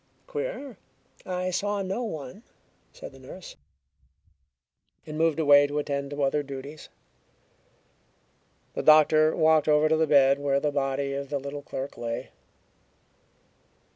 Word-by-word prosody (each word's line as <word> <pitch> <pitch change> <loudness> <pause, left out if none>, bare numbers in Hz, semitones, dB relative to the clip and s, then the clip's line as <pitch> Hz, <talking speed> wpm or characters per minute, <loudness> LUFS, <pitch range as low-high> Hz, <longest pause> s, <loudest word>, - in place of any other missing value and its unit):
"Queer! 445 - -6 0.5
I 185 0 -2
saw 200 +2 -1
no 195 +5 -3
one," 160 - -7 0.5
said - - -10
the 135 - -16
nurse, 155 +8 -11 1.5
and 155 -1 -7
moved 160 0 +1
away 145 -2 +6
to 145 +1 -4
attend 140 -1 -2
to 145 0 -3
other 145 +2 +1
duties. 140 +2 -9 1.8
The - - -3
doctor 155 0 +5
walked 160 -1 +3
over 150 0 +4
to 160 - +3
the 160 0 +2
bed 140 -1 +4
where 140 -1 +1
the 150 +1 -1
body 140 0 -1
of 140 0 -5
the 145 - -1
little 140 +1 -6
clerk 135 -1 -7
lay. 115 -1 -5
145 Hz, 135 wpm, -26 LUFS, 140-160 Hz, 1.8 s, away